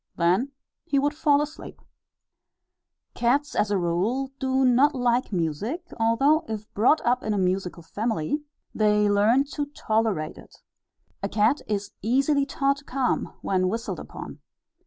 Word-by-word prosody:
Then 185 Hz, +11 st, +1 dB, 0.3 s
he 295 Hz, -5 st, -1 dB
would 290 Hz, +2 st, +2 dB
fall 295 Hz, -1 st, +3 dB
asleep. 305 Hz, +1 st, -9 dB, 1.3 s
Cats, 275 Hz, +5 st, +1 dB
as 210 Hz, 0 st, +1 dB
a 205 Hz, -, +1 dB
rule, 195 Hz, +10 st, -1 dB
do 265 Hz, 0 st, +1 dB
not 265 Hz, +4 st, +4 dB
like 245 Hz, -1 st, +1 dB
music; 200 Hz, -, -3 dB
although, 270 Hz, +8 st, +3 dB
if 215 Hz, -1 st, -6 dB
brought 245 Hz, +9 st, +3 dB
up 245 Hz, +1 st, +2 dB
in 215 Hz, -3 st, -1 dB
a -, -, -1 dB
musical 185 Hz, -2 st, -1 dB
family, 220 Hz, -, -2 dB, 0.3 s
they 210 Hz, -1 st, +3 dB
learn 210 Hz, +6 st, +4 dB
to 290 Hz, 0 st, -3 dB
tolerate 220 Hz, -, -1 dB
it. -, -, -16 dB, 0.7 s
A 200 Hz, -, -2 dB
cat 220 Hz, +8 st, +2 dB
is 205 Hz, -1 st, -2 dB
easily 275 Hz, +5 st, +2 dB
taught 275 Hz, 0 st, +1 dB
to 285 Hz, -, -13 dB
come 265 Hz, -2 st, -1 dB
when 185 Hz, -1 st, +1 dB
whistled 230 Hz, +3 st, -3 dB
upon. -, -, -9 dB
230 Hz, 145 wpm, -25 LUFS, 205-275 Hz, 1.3 s, not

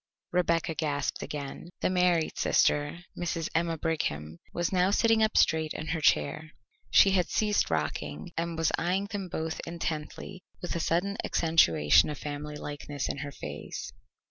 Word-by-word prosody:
Rebecca 170 Hz, -2 st, +1 dB
gasped 145 Hz, -2 st, -2 dB
again. 145 Hz, +3 st, -6 dB
The -, -, +1 dB
married 180 Hz, -3 st, +2 dB
sister, 145 Hz, +4 st, +2 dB
Mrs. 170 Hz, -2 st, -2 dB
Emma 165 Hz, 0 st, 0 dB
Brigham, 80 Hz, -, -2 dB
was 175 Hz, -1 st, -1 dB
now 185 Hz, 0 st, +3 dB
sitting 225 Hz, +2 st, +3 dB
up 220 Hz, 0 st, +2 dB
straight 160 Hz, -1 st, +3 dB
in 155 Hz, -, -5 dB
her 160 Hz, -1 st, -1 dB
chair; 150 Hz, -, +1 dB, 0.4 s
she 110 Hz, -, +6 dB
had 185 Hz, -2 st, +2 dB
ceased 210 Hz, -1 st, +1 dB
rocking, 75 Hz, -1 st, -3 dB
and 165 Hz, 0 st, -2 dB
was 165 Hz, -1 st, +2 dB
eyeing 185 Hz, +4 st, 0 dB
them 195 Hz, -3 st, -4 dB
both 160 Hz, 0 st, -3 dB
intently 165 Hz, +2 st, -5 dB, 0.2 s
with 175 Hz, -, -4 dB
a -, -, 0 dB
sudden 180 Hz, +5 st, 0 dB
accentuation 80 Hz, -, +4 dB
of 150 Hz, -, -4 dB
family 150 Hz, 0 st, -5 dB
likeness 145 Hz, -1 st, -5 dB
in -, -, -3 dB
her 145 Hz, 0 st, -5 dB
face. 75 Hz, -, -7 dB
160 Hz, 155 wpm, -29 LUFS, 145-175 Hz, 0.4 s, she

